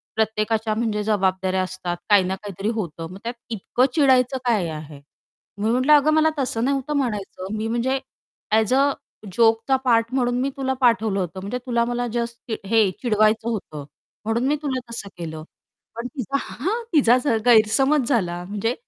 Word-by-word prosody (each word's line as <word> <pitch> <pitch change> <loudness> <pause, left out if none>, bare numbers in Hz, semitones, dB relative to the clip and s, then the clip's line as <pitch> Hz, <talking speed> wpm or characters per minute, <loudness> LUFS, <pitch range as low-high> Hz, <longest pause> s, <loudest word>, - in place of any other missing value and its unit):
प्रत्येकाच्या 220 0 0
म्हणजे 215 -2 -1
जबाबदाऱ्या 190 -2 +1
असतात, 185 -1 -4
काही 205 -2 +6
ना 185 +1 -2
काहीतरी 200 +1 -5
होतं. 170 -6 -4
मग 185 - -9
त्यात 235 +1 -3 0.2
इतकं 235 +3 0
चिडायचं 265 -3 +3
काय 215 -8 +2
आहे?" 155 -2 -8 0.6
मी 210 +2 0
म्हटलं, 255 +5 +4
"अगं, 295 +1 +5
मला 315 0 +4
तसं 240 -4 -1
नव्हतं 275 +2 -1
म्हणायचं 205 -6 -3
मी 220 +1 -2
म्हणजे 240 +4 0 0.5
ॲज 220 +2 +3
अ 275 +2 +4 0.4
जोकचा 230 +4 +3
पार्ट 230 -2 +4
म्हणून 245 -2 +1
मी 270 - 0
तुला 265 -1 -1
पाठवलं 220 -4 +3
होतं, 185 +1 -4
म्हणजे 200 +6 -4
तुला 235 -2 +1
मला 245 0 -2
जस्ट 235 0 -4
ह - - +1
हे 220 -3 +4
चिडवायचं 215 -1 +2
होतं" 155 -10 -5 0.4
"म्हणून 230 +4 0
मी 295 - +2
तुला 270 -4 -2
तसं 215 -4 -5
केलं." 160 -2 -6 0.5
पण 235 +2 -4
तिचा 275 0 -3
हां, 395 - -3
तिचा 255 -6 +5 0.3
गैरसमज 245 +4 +4
झाला 175 -9 0
म्हणजे 210 +4 -1
225 Hz, 165 wpm, -22 LUFS, 200-255 Hz, 0.6 s, काही